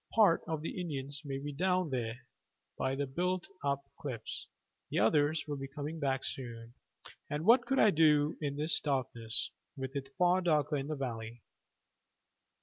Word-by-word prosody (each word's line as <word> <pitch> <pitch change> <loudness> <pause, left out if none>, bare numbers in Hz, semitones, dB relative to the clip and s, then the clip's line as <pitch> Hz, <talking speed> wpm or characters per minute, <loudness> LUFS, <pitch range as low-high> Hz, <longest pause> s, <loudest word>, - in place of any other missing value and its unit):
"Part 205 -7 +6
of 160 -2 -2
the 180 - -3
Indians 140 -4 -3
may 135 -2 -3
be 145 +1 -5
down 180 +1 +1
there 120 -1 -2 0.5
by 130 0 0
the 140 +1 -1
built 180 +6 -1 0.2
up 140 -1 +1 0.2
cliffs; 120 -6 -5 0.4
the - - -2
others 145 +8 +3
will 145 -1 -3
be 135 0 -5
coming 150 +3 -5
back 135 -2 0
soon; 115 -2 -5 0.6
and 150 +3 -2
what 240 +3 +6
could 270 +2 +1
I 215 - +6
do 150 -2 +4
in 140 -2 -1
this 150 +2 +3
darkness, 125 -5 -1 0.3
with 130 0 -5
it 135 -1 -3
far 180 +1 +4
darker 155 -4 +2
in 135 0 -3
the 155 - -2
valley? 115 -4 -5
145 Hz, 165 wpm, -33 LUFS, 135-160 Hz, 0.6 s, Part